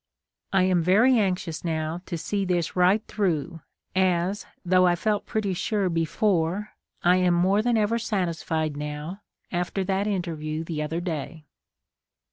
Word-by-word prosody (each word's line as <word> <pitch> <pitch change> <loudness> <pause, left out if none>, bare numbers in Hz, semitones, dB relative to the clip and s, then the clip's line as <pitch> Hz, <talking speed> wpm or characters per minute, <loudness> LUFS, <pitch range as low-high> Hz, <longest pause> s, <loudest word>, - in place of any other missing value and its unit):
I 190 -1 +4
am 185 -2 +3
very 220 +9 +5
anxious 180 -5 -1
now 160 0 -2
to 170 - -3
see 200 +5 -2
this 175 -3 -1
right 185 +4 +3
through, 170 -5 -1 0.3
as, 185 +1 +1 0.2
though 185 0 +5
I 175 - +3
felt 210 +3 -1
pretty 215 -4 -1
sure 195 +1 0
before, 175 +3 0 0.3
I 180 +1 +5
am 180 -1 +3
more 190 +4 +3
than 240 0 +2
ever 220 +2 +1
satisfied 165 -7 -1
now 150 +6 -5 0.3
after 180 +2 -1
that 195 +2 0
interview 165 -5 -2
the 160 -2 -4
other 160 +3 -2
day. 160 -2 -5
180 Hz, 145 wpm, -25 LUFS, 165-200 Hz, 0.3 s, very